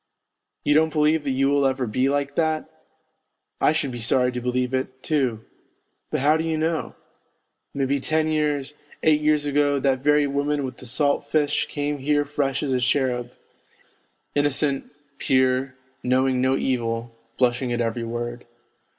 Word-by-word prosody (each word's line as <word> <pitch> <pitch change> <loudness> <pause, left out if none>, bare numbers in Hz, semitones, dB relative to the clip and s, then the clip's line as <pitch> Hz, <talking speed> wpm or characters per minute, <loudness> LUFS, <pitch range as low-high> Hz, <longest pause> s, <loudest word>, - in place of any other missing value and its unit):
You 145 - +3
don't 160 +1 +3
believe 150 0 +2
that - - 0
you 135 +1 +2
will 140 0 +3
over 130 -1 +1
be 130 +5 0
like 140 0 -1
that? 160 -1 0 0.9
I - - +5
should 145 -3 -1
be 120 - -6
sorry 125 +2 +2
to 125 0 -4
believe 125 +1 -1
it, 130 0 -3
too, 130 -8 0 0.6
but - - -1
how 150 +3 +4
do 160 - -2
you 160 -1 -1
know; 160 +1 -1 0.8
maybe 140 0 0
ten 155 +3 0
years, 150 -2 0 0.3
eight 155 -1 +4
years 150 -1 +2
ago 145 0 +2
that 135 -1 +1
very 150 +2 +3
woman 145 +1 -1
with 130 -2 -7
the 130 - -10
salt 145 +3 +1
fish 145 -1 +1
came 145 0 -3
here 145 +2 +1
fresh 140 -2 -1
as 135 -3 0
a 130 - +2
cherub, 125 -1 0 1.0
innocent, 145 -1 +1 0.3
pure, 130 0 +1 0.3
knowing 130 0 +2
no 130 +1 +2
evil, 115 -2 -2 0.2
blushing 125 0 +1
at 120 - -1
every 115 0 -1
word. 120 +1 -5
135 Hz, 160 wpm, -23 LUFS, 125-145 Hz, 1.0 s, I